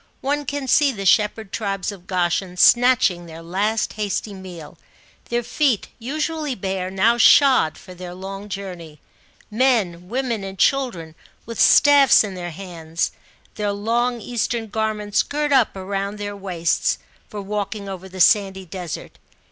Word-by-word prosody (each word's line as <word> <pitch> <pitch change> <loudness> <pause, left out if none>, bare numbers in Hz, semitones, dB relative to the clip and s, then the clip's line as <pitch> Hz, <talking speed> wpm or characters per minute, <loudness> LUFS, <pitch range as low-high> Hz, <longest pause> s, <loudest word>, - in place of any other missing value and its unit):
One 290 +2 -1
can 285 -1 -3
see 285 +2 +4
the 200 -5 -6
shepherd 210 +1 +2
tribes 195 -3 -2
of 185 -3 -13
Goshen 180 0 -1
snatching 230 -7 +4
their 165 0 -10
last 205 +6 -1
hasty 210 0 -3
meal; 180 -5 -10 0.5
their 240 0 0
feet, 260 -3 0
usually 300 +3 -3
bare, 190 -2 -3
now 220 +5 +2
shod 255 - +5
for 185 - -12
their 180 0 -9
long 195 +2 -8
journey; 180 -6 -7 0.5
men, 210 -8 +1
women, 240 -3 -2
and 195 0 -7
children 185 - 0 0.3
with 230 -1 -7
staffs 285 -4 +6
in 205 -3 -5
their 175 -1 -5
hands, 165 -2 -4 0.4
their 210 -1 -2
long 235 +4 0
Eastern 235 0 -3
garments 215 -1 0
girt 295 0 -2
up 260 -5 +5
round 195 +2 -4
their 205 0 -5
waists, 180 -4 -1 0.3
for 210 - -7
walking 205 0 -4
over 190 -1 -7
the 185 0 -10
sandy 190 -1 +3
desert. 180 -1 -7
200 Hz, 145 wpm, -21 LUFS, 185-235 Hz, 0.5 s, staffs